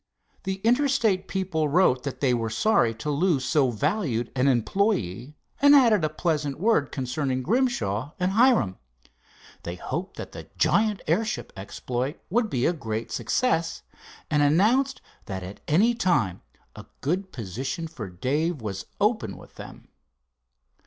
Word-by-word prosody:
The 190 0 -1
Interstate 235 -6 +2
people 180 -6 -1
wrote 145 -5 +3
that 140 - -5
they 130 -3 +3
were 115 -2 -1
sorry 120 - +2
to 150 +7 -3
lose 145 -3 +1
so 140 -3 +3
valued 125 - -1
an 130 +1 +2
employe, 130 - 0 0.3
and 285 +1 +8
added 230 - +5
a 155 - +2
pleasant 150 -3 -1
word 195 -8 +2
concerning 130 0 -2
Grimshaw 150 - 0
and 180 +1 +1
Hiram. 220 - +3 0.8
They 85 - -5
hoped 175 - -5
that - - -7
the - - -10
giant 215 -2 +2
airship 220 0 -1
exploit 120 - -4
would 230 +1 +2
be 125 -2 0
a 175 - +3
great 115 -7 -4
success, 170 -10 0 0.5
and 150 -1 +3
announced 220 - +3 0.2
that 95 -3 -5
at 95 +3 -8
any 205 +11 +4
time 135 - +1 0.3
a - - -11
good 185 +6 -1
position 130 - -4
for 115 -11 -7
Dave 145 - -1
was 100 -4 -5
open 215 +2 0
with - - -15
them. - - -12
150 Hz, 145 wpm, -25 LUFS, 125-200 Hz, 0.8 s, and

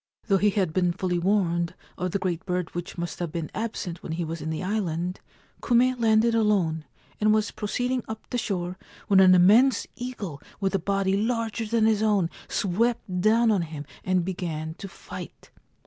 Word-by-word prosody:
Though 195 -3 +3
he 210 - +4
had 190 -5 0
been 180 -1 +2
fully 180 -1 -1
warned 175 -3 +1 0.2
of 180 - -2
the 190 - 0
great 180 -2 -2
bird 180 -2 -2
which 175 +1 -6
must 170 -2 -4
have 175 -3 -3
been 165 -1 -4
absent 205 -6 -4
when 160 - -5
he 170 +1 -2
was 165 0 -5
in 155 - -4
the 160 +3 -3
island, 180 -3 -2 0.4
Kume 250 +1 +3
landed 225 0 +4
alone, 195 -8 +1 0.3
and 215 0 +4
was 215 -1 +2
proceeding 245 +4 -2
up 220 0 -7
the 245 - 0
shore 180 -4 -3 0.3
when 195 -1 +6
an 185 -1 +8
immense 215 +7 +5
eagle 240 - -6 0.2
with 195 -1 0
a 195 - +2
body 195 +1 +1
larger 225 +1 -1
than 225 0 +2
his 220 -1 +3
own 205 -6 +2 0.2
swept 195 -1 0
down 225 +3 +4
on 200 -4 +2
him 155 -3 -6 0.2
and 185 -2 +1
began 160 -4 -4
to 195 - -6
fight. 190 - -10
190 Hz, 185 wpm, -26 LUFS, 175-220 Hz, 0.4 s, an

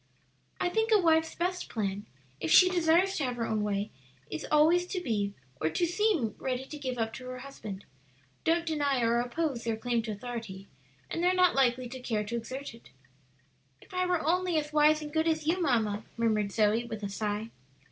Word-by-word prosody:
"I - - +1
think 445 +4 0
a 430 - +7
wife's 320 -2 +3
best 360 +1 -2
plan, 205 -2 -3 0.3
if 160 - -2
she 365 - +8
desires 355 +2 +3
to 305 - 0
have 250 -2 -1
her 230 -1 -2
own 215 -1 -1
way, 205 0 -1 0.4
is 155 - -4
always 325 +4 +4
to 370 - -2
be 205 - -1 0.3
or 155 - +2
to 345 - +1
seem 350 - +1
ready 260 0 -2
to 300 - -8
give 255 -3 -3
up 225 -1 -1
to 255 - -8
her 255 0 -5
husband. 220 -7 -8 0.6
Don't 335 +1 +2
deny 285 -6 +1
or 230 +1 +3
oppose 245 +1 -2
their 225 -2 -1
claim 240 0 0
to 220 -1 -4
authority, 210 -3 -7 0.4
and 335 - -2
they - - +4
are 365 - +3
not 365 -1 +5
likely 255 -2 +2
to 260 +2 -8
care 225 -4 -1
to 220 +3 -4
exert 255 +4 -5
it." 230 - -16 0.9
"If - - -18
I 365 0 +1
were 350 -4 0
only 355 +1 +2
as 300 0 -2
wise 305 0 +4
and 300 0 -8
good 320 +1 +2
as 315 -1 0
you, 350 +4 +1
mamma!" 220 -8 +1
murmured 215 -3 +1
Zoe 215 +2 +2
with 220 -3 -7
a - - -1
sigh. 210 +2 -3
255 Hz, 210 wpm, -30 LUFS, 220-325 Hz, 0.9 s, she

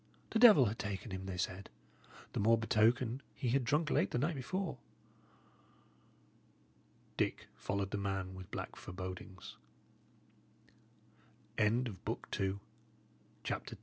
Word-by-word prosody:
The 225 - +2
devil 215 - +9
had 110 +1 -2
taken 100 +1 -4
him, 95 0 -4
they 95 -1 -4
said; 90 +2 -3 0.6
the - - -1
more 115 +3 +5
betoken, 115 +3 +2
he 125 - -1
had 135 +2 +3
drunk 150 +6 +1
late 95 - +3
the - - -1
night 150 +7 +1
before." 155 +2 -3 2.4
Dick - - -1
followed 100 -1 -2
the 105 - -1
man 95 -2 -2
with 95 -1 -9
black - - -5
forebodings. 95 0 -7 2.0
CHAPTER 105 -1 +4
III 120 - +2
THE 125 - -2
ROOM 95 - -11
OVER - - -1
THE 95 0 0 0.8
CHAPEL - - -3
105 Hz, 135 wpm, -35 LUFS, 95-130 Hz, 2.4 s, devil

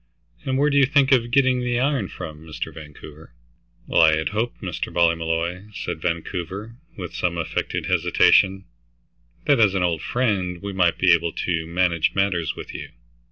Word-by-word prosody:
And 130 0 0
where 145 +2 +2
do 140 - +2
you 135 - +5
think 140 -1 +3
of 120 -3 +3
getting 130 0 +3
the 120 -1 0
iron 135 -6 0
from, 75 -3 -8
Mr. 80 -2 -6
Vancouver?" 75 -2 -12 0.5
"Well, - - +3
I 80 -1 +6
had 80 - -1
hoped, 110 +3 -3
Mr. - - -4
Ballmolly," 85 +2 0
said 80 - -5
Vancouver, 90 +6 -4 0.2
with 90 -3 -7
some 85 -1 -1
affected 85 - -3
hesitation, 95 0 +3 0.8
"that 140 -4 +3
as 100 -3 +4
an 95 - +1
old 85 -3 0
friend, 100 -8 -1
we 100 +1 -6
might 90 -3 +2
be 90 -2 +5
able 85 0 +1
to 80 -2 -2
manage 85 -1 +1
matters 95 -5 0
with - - -9
you. - - -7
90 Hz, 170 wpm, -23 LUFS, 85-115 Hz, 0.8 s, I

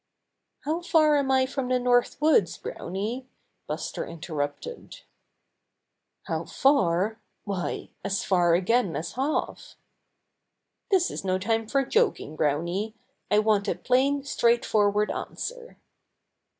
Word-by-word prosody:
"How 320 +4 -2
far 315 -3 +4
am 275 -2 0
I 260 0 +4
from 265 -1 -3
the 255 - +3
North 245 0 +2
Woods, 290 - +3
Browny?" 215 +8 -5 0.4
Buster - - -4
interrupted. 155 - -6 1.2
"How - - -3
far? 220 -5 +2 0.2
Why, 195 -3 -4
as 195 0 -1
far 175 -3 +3
again 190 0 +1
as 165 - -4
half." 275 +4 -2 1.1
"This 375 -3 +3
is - - -5
no 185 -1 +1
time 225 +3 -1
for 275 +3 +1
joking, 415 - +1
Browny. 170 +9 -1 0.3
I 210 - +3
want 210 -1 +2
a - - 0
plain, 275 +3 +1
straightforward 215 -5 +2
answer." - - -6
225 Hz, 115 wpm, -26 LUFS, 190-275 Hz, 1.2 s, far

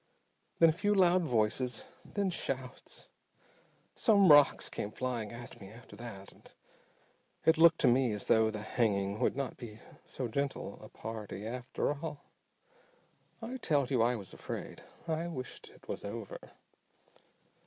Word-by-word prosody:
Then 165 - +7
a - - +2
few 205 +4 +1
loud 185 -1 +5
voices, 120 -1 0 0.2
then 200 -2 -2
shouts. 130 -6 -5 0.9
Some 200 -7 +5
rocks 145 -1 +6
came 105 - -4
flying 120 -3 -3
at 120 0 -9
me 95 - -10
after 115 +3 -13
that, 105 -5 -9
and - - -17 0.9
it 160 0 +4
looked 165 0 +7
to 135 - +5
me 125 0 +4
as 105 -1 -3
though 110 0 +4
the 105 -1 -5
hanging 100 -3 0
would - - +1
not 135 -2 -3
be 110 -4 -9 0.3
so 130 - -4
gentle 140 +4 -3
a - - -11
party 110 -2 -7
after 125 +4 -2
all. 150 0 -7 1.2
I 245 +3 -4
tell 145 - +2
you 125 -2 +1
I 120 +2 +3
was 100 -5 -8
afraid. - - -7 0.3
I 165 +1 -1
wished 130 -7 -7
it - - -20
was - - -5
over. 105 0 -6
125 Hz, 150 wpm, -32 LUFS, 110-155 Hz, 1.2 s, Then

